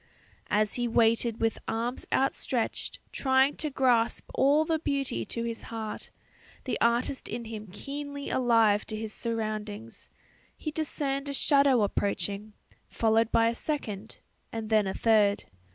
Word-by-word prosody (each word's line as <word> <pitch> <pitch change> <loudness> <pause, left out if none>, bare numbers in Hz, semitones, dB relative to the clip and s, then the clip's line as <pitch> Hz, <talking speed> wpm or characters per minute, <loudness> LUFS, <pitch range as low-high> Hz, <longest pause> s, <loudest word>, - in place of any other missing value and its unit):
As 210 0 +2
he 240 -1 -1
waited 230 0 +3
with 225 0 0
arms 235 +3 -2
outstretched 260 -3 0
trying 265 +1 +3
to 305 - -1
grasp 250 -4 +2
all 290 +3 +4
the 320 0 0
beauty 275 - -1
to 230 - -2
his 230 -1 -4
heart, 220 -2 -6 0.5
the - - -3
artist 240 +3 +1
in 235 - -5
him 215 -1 -7
keenly 285 +5 -6
alive 225 -4 +3
to 215 - -3
his 215 0 -4
surroundings, 215 -1 -4 0.5
he 310 - -4
discerned 285 -2 -1
a - - -3
shadow 275 -5 +4
approaching, 200 +1 -2 0.4
followed 225 0 +2
by 230 0 +4
a - - -1
second 225 -7 -4 0.3
and 225 -1 -5
then 215 -2 +4
a 190 - -3
third. 210 -3 +3
230 Hz, 140 wpm, -28 LUFS, 215-270 Hz, 0.5 s, all